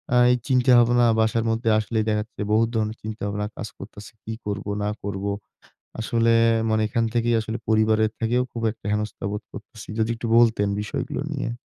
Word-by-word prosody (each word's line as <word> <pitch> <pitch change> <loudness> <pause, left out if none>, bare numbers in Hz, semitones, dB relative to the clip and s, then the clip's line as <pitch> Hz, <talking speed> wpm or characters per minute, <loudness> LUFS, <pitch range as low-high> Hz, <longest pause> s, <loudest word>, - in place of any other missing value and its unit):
আ - - +6
এই 125 - +3
চিন্তা-ভাবনা, 120 -2 +4
বাসার 110 +1 +1
মধ্যে 115 +1 0
আসলেই 110 0 -1
দেখা 105 0 +1
যাচ্ছে 110 - -11
বহুত 115 +1 +3
ধরনের 110 0 -1
চিন্তা-ভাবনা 105 -1 -3
কাজ 105 - -4
করতাছি, 105 0 -11
কি 110 - -4
করব 100 -1 -3 0.2
না 105 - 0
করব? 100 0 -4 0.8
আসলে 115 +1 +2 0.4
মানে 110 0 +2
এখান 115 +1 0
থেকেই 120 0 +2
আসলে 110 +1 -4
পরিবারের 110 0 +3
থেকেও 120 +2 +1
খুব 115 - -5
একটা 110 -3 -13
হেনস্থা 105 -2 -3
বোধ 105 - -4
করতেছি। - - -11
যদি 110 +1 +1
একটু 115 - -5
বলতেন 110 -4 +3
বিষয়গুলো 105 +5 -4
নিয়ে। 140 -5 -2
110 Hz, 175 wpm, -24 LUFS, 105-115 Hz, 0.8 s, আ